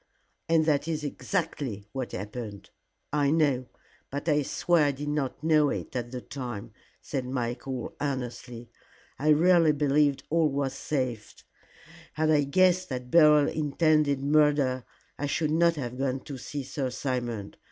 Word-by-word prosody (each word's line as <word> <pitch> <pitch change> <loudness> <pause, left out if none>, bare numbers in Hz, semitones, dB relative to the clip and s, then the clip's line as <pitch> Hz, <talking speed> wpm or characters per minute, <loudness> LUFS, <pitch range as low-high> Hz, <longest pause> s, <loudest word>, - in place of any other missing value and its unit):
"And 165 -1 +4
that 150 -1 +1
is 155 -2 -2
exactly 145 - -3
what 130 -2 -5
happened." 105 +1 -7 0.4
"I 145 -2 +2
know. 140 -5 +2 0.4
But 140 +3 -5
I 150 -2 +3
swear 165 +3 +2
I 145 - +2
did 145 +2 -5
not 145 -1 -2
know 155 -2 +4
it - - -5
at 120 -1 -3
the 125 0 -6
time," 120 -7 -7 0.3
said 135 - -3
Michael, 125 0 -4
earnestly. 125 -4 -4 0.5
"I 150 +3 +1
really 165 0 +5
believed 145 -1 +2
all 165 -1 +3
was 135 -1 -1
safe. 130 -6 -3 0.8
Had 155 0 +1
I 145 -2 +3
guessed 185 +4 +3
that 125 -1 -5
Beryl 150 -3 +6
intended 150 -2 +1
murder, 145 -3 +2 0.3
I 145 - -1
should 150 +1 0
not 170 +1 +3
have 125 -3 -5
gone 135 -1 -1
to 140 - -8
see 140 +3 -5
Sir 135 0 -3
Simon. 120 -5 -3
140 Hz, 150 wpm, -27 LUFS, 125-155 Hz, 0.8 s, Beryl